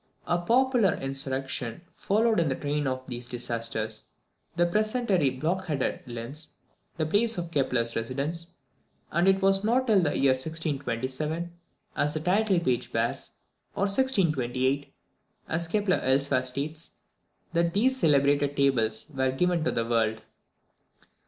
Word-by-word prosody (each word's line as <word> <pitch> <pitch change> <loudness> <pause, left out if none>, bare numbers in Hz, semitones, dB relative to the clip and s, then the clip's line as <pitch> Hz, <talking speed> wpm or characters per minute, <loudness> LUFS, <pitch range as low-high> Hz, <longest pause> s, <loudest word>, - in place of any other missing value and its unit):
A 175 - +1
popular 235 0 +3
insurrection 135 -2 -2
followed 220 +1 +1
in 165 -3 +2
the 130 - 0
train 145 0 -1
of 130 0 -3
these 120 -1 -7
disasters. 115 -3 -3 0.5
The 175 0 +3
peasantry 210 - +1
blockaded 155 +2 -1
Linz, 120 +6 -5 0.4
the 160 - 0
place 215 +7 +1
of 170 -1 -4
Kepler's 125 -5 0
residence, 140 +9 -3 0.6
and 170 +3 +2
it 195 0 +3
was 195 0 +3
not 245 +4 +2
till 215 -6 +4
the 155 -4 0
year 135 -1 +4
1627, 150 +2 -2 0.4
as 150 +1 0
the - - 0
title 190 +3 +2
page 130 -7 -1
bears, 115 +1 -1 0.5
or - - 0
1628, 145 - +1 0.6
as 165 +1 -1
Kepler 205 +1 +1
elsewhere 135 0 +2
states, 145 +5 -2 0.6
that 170 +1 +1
these 255 +6 +3
celebrated 145 - +2
Tables 115 -6 +2
were 130 -1 +1
given 175 +4 +1
to - - +1
the 115 - -1
world. 110 -1 0
150 Hz, 135 wpm, -27 LUFS, 130-180 Hz, 0.6 s, till